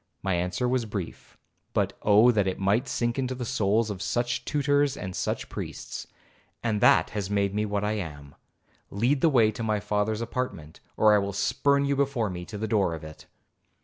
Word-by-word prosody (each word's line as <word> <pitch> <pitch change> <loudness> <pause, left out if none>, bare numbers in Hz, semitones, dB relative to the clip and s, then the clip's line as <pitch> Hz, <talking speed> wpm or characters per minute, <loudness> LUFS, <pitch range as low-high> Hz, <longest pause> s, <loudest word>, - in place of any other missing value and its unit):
My 95 - 0
answer 90 +6 -1
was 125 -1 0
brief, 100 -5 -7 0.4
but - - +1
Oh 110 +4 +6
that 105 -4 +1
it 95 - -1
might 105 +7 +1
sink 120 +1 -1
into 130 -1 -1
the 125 -1 -4
souls 110 -2 +1
of 95 -2 -6
such 120 +3 -1
tutors 145 -1 +1
and 95 -2 -6
such - - -2
priests! - - -7 0.6
'And 110 -3 0
that - - +5
has 100 -2 -3
made 100 -1 +1
me 105 +1 0
what 100 0 -1
I 105 - 0
am. 75 -6 -8 0.6
Lead 125 +7 +1
the 165 - +5
way 115 -6 +4
to 110 - -7
my 110 -2 0
father's 105 +2 -1
apartment, 115 -10 -4 0.2
or 110 -1 +5
I 105 - +5
will 100 0 -3
spurn 140 +8 +2
you 140 0 +1
before 135 -7 0
me 90 -1 -6
to 105 - -7
the 110 +2 -3
door 100 -6 +1
of 80 - -10
it.' 75 0 -11
105 Hz, 200 wpm, -27 LUFS, 100-125 Hz, 0.6 s, Oh